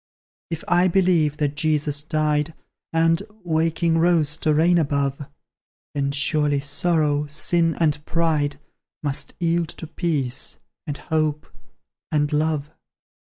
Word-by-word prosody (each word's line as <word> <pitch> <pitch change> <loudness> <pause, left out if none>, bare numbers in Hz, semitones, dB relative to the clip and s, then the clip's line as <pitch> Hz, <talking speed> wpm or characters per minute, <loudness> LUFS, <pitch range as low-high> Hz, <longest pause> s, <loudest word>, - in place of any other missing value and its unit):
If 165 -1 -5
I 175 +1 +4
believe 170 -5 +2
that 145 -2 0
Jesus 150 -1 +1
died, 155 0 0 0.4
And 165 +1 +3 0.2
waking, 165 0 +1
rose 160 -3 +3
to 155 - +1
reign 170 +3 +4
above; 140 -2 -1 0.7
Then 140 -1 -1
surely 145 0 +2
Sorrow, 150 0 +1
Sin, 165 +2 +1
and 150 -3 +1
Pride, 155 -3 0 0.5
Must 140 -2 -2
yield 170 -1 +1
to - - -8
Peace, 145 -6 -2 0.3
and 145 -1 -3
Hope, 155 -1 -1 0.7
and 150 -1 +1
Love. 150 -1 0
155 Hz, 120 wpm, -23 LUFS, 145-165 Hz, 0.7 s, I